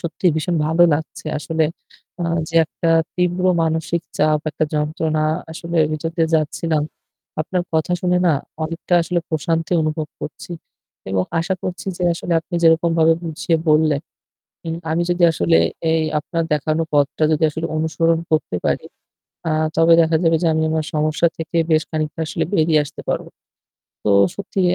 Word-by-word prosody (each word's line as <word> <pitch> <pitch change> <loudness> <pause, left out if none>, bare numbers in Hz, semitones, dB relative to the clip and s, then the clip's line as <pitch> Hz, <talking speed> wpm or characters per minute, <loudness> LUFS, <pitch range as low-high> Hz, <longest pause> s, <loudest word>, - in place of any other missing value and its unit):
সত্যি 170 +2 -3
ভীষণ 170 +2 -1
ভালো 165 +2 +3
লাগছে। 155 +1 -6
আসলে 160 +1 0 0.5
অ্যাঁ 170 -1 -1
যে 165 - -11
একটা 165 +1 -2 0.2
তীব্র 180 0 0 0.2
মানসিক 160 +1 -1 0.2
চাপ, 155 0 +3
একটা 155 - -1
যন্ত্রণা 155 +1 0 0.3
আসলে 170 +1 -5
ভিতর 155 +1 -3
দিয়ে 165 -1 +2
যাচ্ছিলাম। 155 0 0 0.6
আপনার 180 +3 -1
কথা 160 +2 +1
শুনে 180 0 +2
না 165 - +5 0.3
অনেকটা 165 +2 -2
আসলে 175 +1 -1
প্রশান্তি 165 +1 -1
অনুভব 155 0 -2
করছি 165 +3 -7 0.6
এবং 95 -1 +1 0.2
আশা 190 +3 -1
করছি 185 +1 -5
যে - - -4
আসলে 170 - -4
আপনি 175 - -9
যেরকমভাবে 165 0 +4
বুঝিয়ে 165 0 -1
বললেন, 155 -2 +3 0.6
হুম। 165 -1 -4
আমি 170 +2 +1
যদি 175 0 0
আসলে 85 - +2 0.4
এই 160 -1 +2 0.2
আপনার 165 +3 -2
দেখানো 155 +2 0
পথটা 145 +1 +2
যদি 155 - 0
আসলে 160 +2 -3
অনুসরণ 160 +1 +1
করতে 155 - 0
পারি - - 0 0.6
অ্যাঁ 155 -1 +1
তবে 165 +1 +6
দেখা 160 0 +2
যাবে 165 0 +4
যে 170 - +2
আমি 160 0 +1
আমার 160 -1 -1
সমস্যা 155 +2 +2
থেকে 165 +1 -3
বেশ 155 0 +4
খানিকটা 155 0 -3
আসলে - - -1
বেরিয়ে 160 -4 +3
আসতে 145 - -10
পারবো। - - -2 0.8
তো 105 - +2 0.2
সত্যি 195 - -4
160 Hz, 160 wpm, -20 LUFS, 155-170 Hz, 0.8 s, তবে